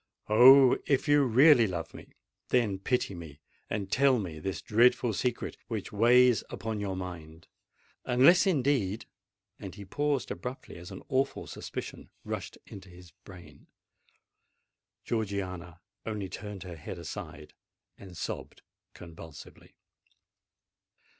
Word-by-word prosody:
Oh! 130 Hz, +4 st, +7 dB
if 140 Hz, +1 st, +1 dB
you 145 Hz, -1 st, +5 dB
really 130 Hz, 0 st, +6 dB
love 85 Hz, -3 st, -5 dB
me—then 110 Hz, -6 st, -3 dB
pity 125 Hz, 0 st, -1 dB
me, 80 Hz, -5 st, -10 dB, 0.3 s
and 100 Hz, -2 st, -4 dB
tell 135 Hz, +1 st, +4 dB
me 85 Hz, -8 st, -5 dB
this 95 Hz, +4 st, -4 dB
dreadful 120 Hz, +1 st, +3 dB
secret 120 Hz, +4 st, -3 dB
which 110 Hz, -4 st, -5 dB
weighs 120 Hz, +1 st, +4 dB
upon 110 Hz, +2 st, -5 dB
your 100 Hz, -2 st, -3 dB
mind! 85 Hz, -3 st, -8 dB, 0.6 s
Unless, 140 Hz, +10 st, +5 dB
indeed——" 130 Hz, -, 0 dB, 0.5 s
And 95 Hz, -2 st, -8 dB
he 100 Hz, -1 st, -10 dB
paused 145 Hz, +5 st, -1 dB
abruptly, 125 Hz, -7 st, -7 dB
as 85 Hz, +1 st, -10 dB
an -, -, -10 dB
awful 135 Hz, +1 st, -1 dB
suspicion -, -, -8 dB, 0.2 s
rushed -, -, -6 dB
into 95 Hz, -1 st, -12 dB
his 90 Hz, -1 st, -15 dB
brain. 75 Hz, -3 st, -15 dB, 1.4 s
Georgiana 95 Hz, -5 st, -4 dB, 0.2 s
only 105 Hz, -4 st, -4 dB
turned 105 Hz, -1 st, -8 dB
her 90 Hz, -3 st, -9 dB
head 80 Hz, +4 st, -8 dB
aside, 75 Hz, -2 st, -8 dB, 0.4 s
and 95 Hz, -3 st, -13 dB
sobbed -, -, -6 dB, 0.3 s
convulsively. 80 Hz, -3 st, -13 dB
100 Hz, 120 wpm, -29 LUFS, 90-125 Hz, 1.4 s, Oh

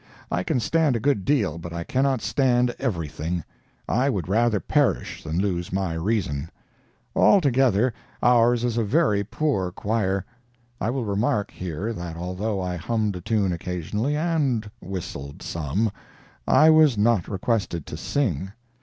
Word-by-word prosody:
I 90 Hz, -, +1 dB
can 105 Hz, -, 0 dB
stand 155 Hz, +3 st, +2 dB
a -, -, 0 dB
good 120 Hz, -7 st, +1 dB
deal, 105 Hz, -, +1 dB
but 85 Hz, 0 st, -7 dB
I 85 Hz, 0 st, -3 dB
cannot 130 Hz, +3 st, +1 dB
stand 125 Hz, -2 st, +2 dB
everything. 85 Hz, -, -2 dB, 0.4 s
I 130 Hz, +4 st, +2 dB
would 95 Hz, -10 st, -2 dB
rather 110 Hz, +2 st, +2 dB
perish -, -, 0 dB
than 80 Hz, +1 st, -3 dB
lose 90 Hz, -2 st, -1 dB
my 95 Hz, -3 st, -1 dB
reason. 80 Hz, -5 st, -1 dB, 0.7 s
Altogether, 130 Hz, -, +4 dB, 0.3 s
ours 120 Hz, 0 st, +4 dB
is 120 Hz, -1 st, 0 dB
a -, -, +2 dB
very 110 Hz, -3 st, +2 dB
poor 100 Hz, -5 st, -1 dB
choir. 100 Hz, -1 st, -1 dB, 0.5 s
I 110 Hz, -, -1 dB
will 125 Hz, -1 st, -2 dB
remark 105 Hz, 0 st, 0 dB
here, 95 Hz, +6 st, -4 dB
that 85 Hz, -4 st, -6 dB
although 95 Hz, +4 st, -2 dB
I 90 Hz, -1 st, -2 dB
hummed 105 Hz, +2 st, -1 dB
a -, -, -8 dB
tune 100 Hz, -1 st, +1 dB
occasionally, 90 Hz, -, -2 dB
and 140 Hz, -10 st, 0 dB
whistled 85 Hz, -7 st, -6 dB
some, 85 Hz, +7 st, -1 dB, 0.6 s
I 155 Hz, +1 st, +6 dB
was 155 Hz, -7 st, +5 dB
not 105 Hz, -3 st, +2 dB
requested 95 Hz, -5 st, -1 dB
to -, -, -7 dB
sing. 95 Hz, -, -1 dB
105 Hz, 145 wpm, -24 LUFS, 90-120 Hz, 0.7 s, I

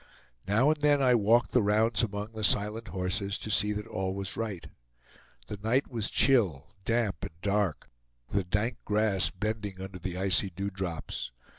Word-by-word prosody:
Now 115 Hz, +9 st, +4 dB
and 155 Hz, -1 st, -2 dB
then 145 Hz, -1 st, +4 dB
I 130 Hz, -2 st, +4 dB
walked 115 Hz, +1 st, +3 dB
the 125 Hz, -, +4 dB
rounds 110 Hz, +2 st, +2 dB
among 105 Hz, -1 st, -3 dB
the 110 Hz, -1 st, -6 dB
silent 105 Hz, +3 st, +2 dB
horses, 95 Hz, +3 st, -2 dB
to 110 Hz, -, -5 dB
see 105 Hz, +1 st, +3 dB
that 105 Hz, 0 st, -5 dB
all 95 Hz, 0 st, -3 dB
was 100 Hz, -1 st, -4 dB
right. 105 Hz, -6 st, -4 dB, 0.8 s
The 105 Hz, -, -6 dB
night 120 Hz, +6 st, +1 dB
was 115 Hz, -4 st, -2 dB
chill, 100 Hz, -, +2 dB
damp, 115 Hz, -5 st, +1 dB
and 80 Hz, -, -8 dB
dark, 100 Hz, -4 st, 0 dB, 0.4 s
the 100 Hz, -1 st, 0 dB
dank 105 Hz, +7 st, -1 dB
grass 105 Hz, -2 st, +2 dB
bending 105 Hz, -1 st, -4 dB
under 95 Hz, -1 st, -7 dB
the 90 Hz, 0 st, -4 dB
icy 95 Hz, +1 st, +4 dB
dewdrops. 95 Hz, -5 st, -4 dB
105 Hz, 165 wpm, -29 LUFS, 95-115 Hz, 0.8 s, Now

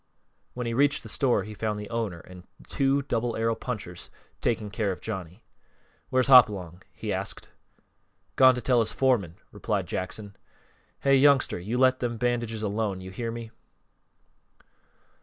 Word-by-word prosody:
When 125 Hz, 0 st, -4 dB
he 115 Hz, -, -2 dB
reached 145 Hz, +3 st, +2 dB
the -, -, -9 dB
store 125 Hz, -8 st, +2 dB
he 105 Hz, +1 st, -8 dB
found 105 Hz, 0 st, -3 dB
the 105 Hz, -, -7 dB
owner 110 Hz, -8 st, -3 dB
and 90 Hz, 0 st, -14 dB, 0.2 s
two 140 Hz, 0 st, +1 dB
Double 120 Hz, -3 st, -1 dB
Arrow 115 Hz, 0 st, +1 dB
punchers 100 Hz, -8 st, -6 dB, 0.3 s
taking 110 Hz, -3 st, -1 dB
care 100 Hz, -1 st, -1 dB
of 90 Hz, -, -6 dB
Johnny. 95 Hz, -6 st, -7 dB, 0.7 s
"Where's 130 Hz, -1 st, +2 dB
Hopalong?" 100 Hz, -9 st, +5 dB
he 105 Hz, -3 st, -4 dB
asked. 95 Hz, +1 st, -5 dB, 0.9 s
"Gone 130 Hz, -1 st, +6 dB
to 125 Hz, -, -4 dB
tell 125 Hz, -1 st, +3 dB
his 115 Hz, -, 0 dB
foreman," 115 Hz, -11 st, +1 dB, 0.2 s
replied -, -, -2 dB
Jackson. 100 Hz, +2 st, -5 dB, 0.7 s
"Hey, 140 Hz, 0 st, +4 dB
youngster, 140 Hz, -7 st, +4 dB
you 105 Hz, +8 st, -3 dB
let 130 Hz, 0 st, +4 dB
them 120 Hz, -2 st, -2 dB
bandages 115 Hz, -2 st, -1 dB
alone! 105 Hz, -2 st, -2 dB
Hear 95 Hz, +5 st, -5 dB
me?" 115 Hz, -1 st, -7 dB
115 Hz, 150 wpm, -27 LUFS, 100-125 Hz, 0.9 s, Gone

